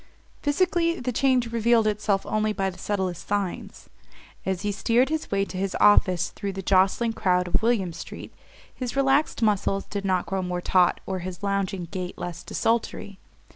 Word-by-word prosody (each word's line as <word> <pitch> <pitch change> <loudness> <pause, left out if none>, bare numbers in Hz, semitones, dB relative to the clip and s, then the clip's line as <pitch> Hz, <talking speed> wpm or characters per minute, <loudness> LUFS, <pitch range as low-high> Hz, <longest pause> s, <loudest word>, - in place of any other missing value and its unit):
Physically 335 +2 +1
the 250 +1 -2
change 250 -1 +2
revealed 230 0 +3
itself 205 -2 0
only 215 0 0
by 195 -2 -1
the 180 - -14
subtlest 190 -4 -3
signs. 200 -3 -3 0.6
As 190 0 -1
he 205 - 0
steered 235 +6 +2
his 315 0 -2
way 195 0 +1
to 185 - -7
his 195 0 -2
office 185 -4 +4
through 200 -2 -5
the 195 0 -6
jostling 195 +5 +3
crowd 180 -4 +1
of 175 - +1
William 220 -7 +1
Street - - -9 0.4
his 250 -1 -5
relaxed 275 -1 +2
muscles 200 -2 +1
did 200 -1 -5
not 185 -2 +1
grow 190 -1 -2
more 180 -1 -2
taut 180 0 +3
or 190 -1 -3
his 180 +2 -7
lounging 200 -2 -1
gait 180 +1 -6
less 175 -2 -5
desultory. 225 -3 -2
200 Hz, 175 wpm, -25 LUFS, 185-230 Hz, 0.6 s, office